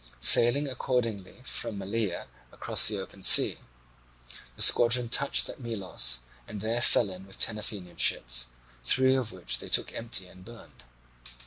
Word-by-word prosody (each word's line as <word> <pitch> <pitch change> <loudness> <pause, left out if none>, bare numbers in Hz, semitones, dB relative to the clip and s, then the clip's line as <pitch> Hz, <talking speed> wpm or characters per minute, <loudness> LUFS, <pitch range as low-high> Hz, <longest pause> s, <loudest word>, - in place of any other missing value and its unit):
Sailing 140 +5 +6
accordingly 120 -4 -5
from 110 - -5
Malea 100 -1 -5 0.3
across - - +3
the 105 - -1
open 95 0 -12
sea, - - +4 1.0
the - - -10
squadron 120 0 +5
touched 140 +3 +1
at - - -9
Melos 95 - -2 0.3
and 105 - -10
there 115 +3 -4
fell 110 -4 +1
in 95 +1 -13
with 95 - -10
ten 110 -2 -2
Athenian 100 -4 -6
ships, - - 0 0.4
three 130 - +1
of 130 -4 -3
which 65 -9 -3
they - - -7
took - - +2
empty 115 -5 -2
and 90 0 -17
burned. 115 - -16
105 Hz, 150 wpm, -26 LUFS, 95-120 Hz, 1.0 s, Sailing